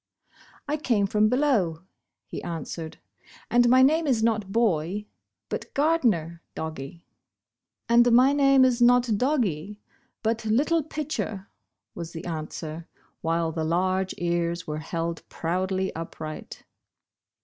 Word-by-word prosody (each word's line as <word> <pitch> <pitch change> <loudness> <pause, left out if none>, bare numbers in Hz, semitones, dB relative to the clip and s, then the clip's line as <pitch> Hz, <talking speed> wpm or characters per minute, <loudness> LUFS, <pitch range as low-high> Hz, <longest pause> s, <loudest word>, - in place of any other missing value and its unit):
"I 295 +1 0
came 235 -9 +1
from 210 +2 +2
below," 220 - +1 0.4
he - - -7
answered, 165 -1 -6 0.5
''and 240 0 +5
my 255 +1 +6
name 315 +4 +3
is 235 -5 +2
not 215 -4 0
Boy, 200 -3 0 0.4
but - - -5
'Gardner,' 230 - +1
doggie." 160 0 -6 0.8
"And 240 +1 +5
my 255 +4 +6
name 275 -2 +5
is 250 -1 +1
not 240 -2 +5
Doggie, 210 - 0 0.4
but 225 +1 0
'Little 285 +10 +2
Pitcher,' 295 -10 -4 0.2
" - - -60
was 170 -1 -7
the 165 +1 -7
answer 160 0 -5 0.3
while 165 0 0
the 160 0 -3
large 185 +3 0
ears 170 0 -1
were 150 0 -4
held 165 +1 -3
proudly 185 +3 -2
upright. 160 -1 -7
195 Hz, 125 wpm, -26 LUFS, 165-245 Hz, 0.8 s, my